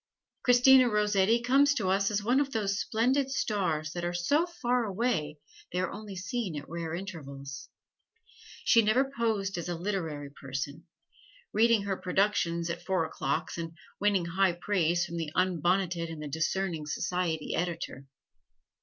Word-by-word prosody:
Christina 250 +1 +6
Rossetti 210 +1 +2
comes 280 +3 +4
to 210 -8 -1
us 195 +1 +2
as 210 -1 -1
one 245 +5 +3
of 280 -1 0
those 205 -3 0
splendid 255 +4 +1
stars 180 - -1
that 175 +1 -5
are 175 0 -2
so 290 - +2
far 250 -8 0
away 195 -8 -1 0.3
they 180 - -1
are 185 -1 -1 0.2
seen 190 0 -3
only - - -2
at - - -12
rare 165 0 -4
intervals. 140 -7 -7 1.0
She 230 - +6
never 250 +6 +2
posed 200 -6 0
as 170 - -5
a 175 - -1
"literary 165 -7 -3
person" 140 +4 -6 0.7
reading 230 -1 +4
her 195 -1 -2
productions 180 -3 +1
at 170 0 -5
four 185 -2 +1
o'clocks, 140 +1 -2
and 165 0 -6 0.2
winning 200 -4 +2
high 185 +1 +2
praise 175 -2 +1
from 170 - -6
the 160 -3 -3
unbonneted 175 -1 +1
and 165 -1 -7
the 150 - -5
discerning 160 +1 -1
society 165 0 -2
editor. 165 -5 -3
185 Hz, 155 wpm, -29 LUFS, 165-220 Hz, 1.0 s, Christina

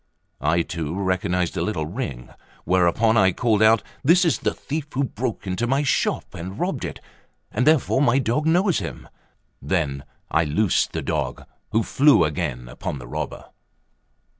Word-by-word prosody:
I 85 +4 +2
too 85 +2 -4
recognised 90 -2 0
a - - -1
little 90 -8 -1
ring; 80 - -5 0.3
whereupon 95 +5 +3
I 95 -3 +5
called 110 +1 +1
out. 110 0 +5 0.2
"This 175 +6 +5
is 165 - +2
the - - 0
thief 150 0 -4
who 140 - +1
broke 120 -3 -4
into 95 +5 -1
my 135 +3 +1
shop 140 - 0
and 95 +4 -7
robbed 175 -6 -2
it; - - -6 0.5
and 125 - 0
therefore 155 -3 +3
my 130 -2 +4
dog 140 +4 0
knows 180 +2 +3
him;" 85 - -7 0.5
then 70 -2 -1 0.3
I 80 - +3
loosed 85 +6 +1
the - - -3
dog, - - -3 0.3
who 110 +1 +2
flew 140 - +4
again 60 -5 -3
upon 65 +3 -5
the 60 -2 -10
robber. - - -5
105 Hz, 165 wpm, -23 LUFS, 85-130 Hz, 0.5 s, I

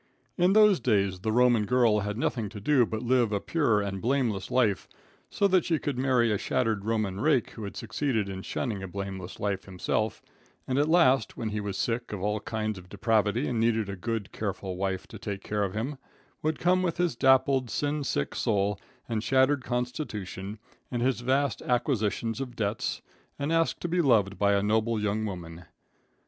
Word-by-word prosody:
In 180 +1 +3
those 210 -4 +6
days 100 -6 +1
the 110 +4 -1
Roman 120 -2 +4
girl 120 -4 +3
had 105 +1 -3
nothing 115 -3 -1
to 105 - -8
do 125 +2 +3
but 110 +2 -4
live 120 -2 +2
a 100 - +1
pure 115 -6 +1
and 95 -1 -4
blameless 120 -6 0
life, 115 -6 +1 0.4
so 200 - +2
that 185 -2 +4
she 165 - +1
could 145 -2 -3
marry 125 -3 +3
a 105 - 0
shattered 110 -4 0
Roman 110 -4 -1
rake 130 -1 +2
who 110 - -7
had 100 - -7
succeeded 110 -1 -1
in 95 -1 -5
shunning 105 -1 -3
a 95 - -5
blameless 95 -1 -6
life 100 -2 -2
himself, 95 +3 -2 0.4
and 130 +1 +1
at 150 +2 +2
last, 135 -8 +3
when 115 -2 -2
he 105 0 -3
was 100 -1 -4
sick 120 +1 -2
of 105 - -4
all 105 +2 -1
kinds 110 -1 -3
of 90 0 -16
depravity 110 +4 +1
and 120 -3 -1
needed 110 -2 +1
a 100 - -4
good, 110 +1 -3
careful 95 -3 -4
wife 95 0 -2
to 110 - -11
take 100 -1 -5
care 105 -1 -1
of 95 -1 -3
him, 130 +6 -3 0.4
would 155 0 0
come 185 +1 +2
with 175 -3 -1
his 175 -6 +1
dappled, 130 0 +3
sin 145 +4 -1
sick 70 - -1
soul 100 -1 0 0.3
and 115 -2 -1
shattered 130 +3 +3
constitution, 115 - -4 0.3
and 120 -2 -2
his 130 -1 +1
vast 135 +3 +1
acquisitions 120 -1 0
of 125 -3 -6
debts, 105 0 -2 0.3
and 145 +3 -1
ask 165 0 +1
to - - -3
be 175 +1 +1
loved 105 - +2
by 100 0 +3
a 100 0 +2
noble 110 +2 +1
young 105 +1 -1
woman. 85 -3 -7
110 Hz, 195 wpm, -28 LUFS, 100-130 Hz, 0.4 s, those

